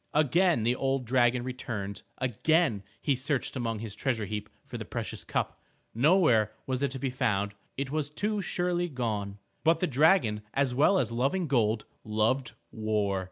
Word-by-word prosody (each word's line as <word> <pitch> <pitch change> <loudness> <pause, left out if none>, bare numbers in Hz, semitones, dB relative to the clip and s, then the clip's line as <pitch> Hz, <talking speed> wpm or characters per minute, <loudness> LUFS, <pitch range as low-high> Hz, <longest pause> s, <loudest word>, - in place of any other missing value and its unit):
Again 155 -1 +3
the 120 +2 +2
old 135 -1 0
dragon 120 0 +3
returned, 115 -6 -5 0.2
again 130 - +2 0.2
he 145 - +3
searched 135 +1 -2
among 115 -3 -2
his 105 -1 -6
treasure 120 -6 -1
heap 105 0 -5 0.2
for - - -7
the - - -4
precious - - -5
cup. - - -2 0.3
Nowhere 125 - +4
was 130 0 -2
it 140 - +2
to 135 - -5
be 130 0 -1
found. 100 -5 0 0.2
It 135 0 -3
was 150 -1 -1
too 210 +7 -1
surely 175 -1 0
gone. 105 -7 -3 0.3
But 165 0 +4
the 180 - +2
dragon, 140 - +3
as 135 -2 +2
well 150 +9 +4
as 120 -9 0
loving 135 +10 0
gold, 115 -6 +1 0.2
loved 115 +4 0 0.2
war. 105 -3 0
130 Hz, 165 wpm, -29 LUFS, 110-150 Hz, 0.3 s, Nowhere